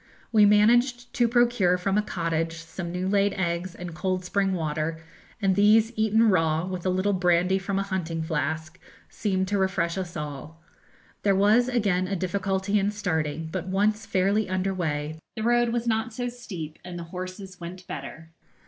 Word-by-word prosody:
We 210 -2 +6
managed 240 +4 +3
to 240 -3 +3
procure 235 -6 +3
from 195 +2 -1
a 210 - +4
cottage 165 -4 -2
some 165 +2 -7
new 180 +1 -2
laid 200 0 +2
eggs 175 0 -2
and 175 -1 -7
cold 185 +1 -2
spring 195 +1 +1
water, 155 -1 -2 0.4
and 195 -3 +2
these 215 +3 +5
eaten 220 +1 +3
raw, 165 -2 +2
with 185 -1 -4
a - - +3
little 185 +2 +1
brandy 180 +1 +2
from 195 +1 -2
a 195 - +1
hunting 170 -4 -3
flask, 160 0 -3 0.3
seemed 190 -3 -1
to 205 -1 +1
refresh 180 -2 0
us 175 -2 -5
all. 150 +1 -7 0.6
There 200 -1 +3
was 215 +5 +4
again 200 -7 +1
a 195 - -1
difficulty 195 +2 0
in 200 +1 +1
starting, 160 -6 -2
but, 185 - -4
once 210 +3 +1
fairly 195 +2 +1
under 185 +1 0
way, 155 -3 -3 0.2
the 220 - -4
road 240 +1 +3
was 235 0 -1
not 225 0 0
so 245 0 -2
steep 185 -11 -8
and 180 -1 -7
the 170 - -5
horses 185 +1 -7
went 180 +2 -8
better. 160 +3 -8
190 Hz, 175 wpm, -26 LUFS, 170-210 Hz, 0.6 s, We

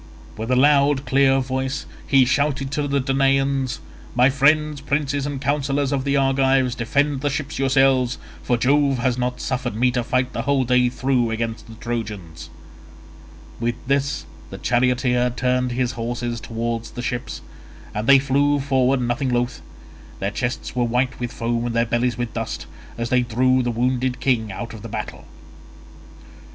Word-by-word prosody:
With 110 +2 -5
a 130 - +3
loud 140 +1 +4
clear 135 +1 +4
voice 130 +1 -3 0.2
he 135 -2 +5
shouted 140 +1 0
to 145 -1 -1
the 140 0 +1
Danaans, 135 0 +1 0.4
"My 125 +2 +5
friends, 150 +1 +2
princes 140 0 -1
and 145 -2 -4
counsellors 140 0 0
of 135 -1 -1
the 140 0 +2
Argives, 135 -1 +2
defend 140 +4 0
the 145 - +1
ships 140 0 -4
yourselves, 135 -2 +3 0.2
for 120 - 0
Jove 140 +2 +2
has 125 0 +1
not 125 0 -2
suffered 125 -4 -2
me 125 +3 +2
to 125 -1 -1
fight 125 +1 0
the - - -2
whole 140 -2 +1
day 125 0 +3
through 125 -2 0
against 115 0 -3
the 115 - -11
Trojans." 105 -8 -5 1.1
With 120 0 -1
this 140 +2 0 0.2
the - - -8
charioteer 125 0 +1
turned 125 0 0
his 125 0 0
horses 120 0 -4
towards 115 0 -3
the 120 - -7
ships, 120 - -4 0.5
and 105 +2 -3
they 140 - +8
flew 140 +2 +2
forward 135 -1 +2
nothing 125 +3 -1
loth. 120 0 -1 0.6
Their 100 +1 -1
chests 120 +3 -3
were 125 - +1
white 125 +2 0
with 120 -1 -3
foam 115 0 -2
and 120 - -3
their 115 0 +3
bellies 120 0 0
with 120 -1 -3
dust, 115 -1 -4 0.3
as 115 0 -3
they 125 -1 +3
drew 130 +2 +2
the 120 - -1
wounded 125 +2 0
king 115 -6 0
out 115 +4 -6
of 110 - -9
the 115 - -8
battle. - - -6
125 Hz, 165 wpm, -22 LUFS, 120-135 Hz, 1.1 s, they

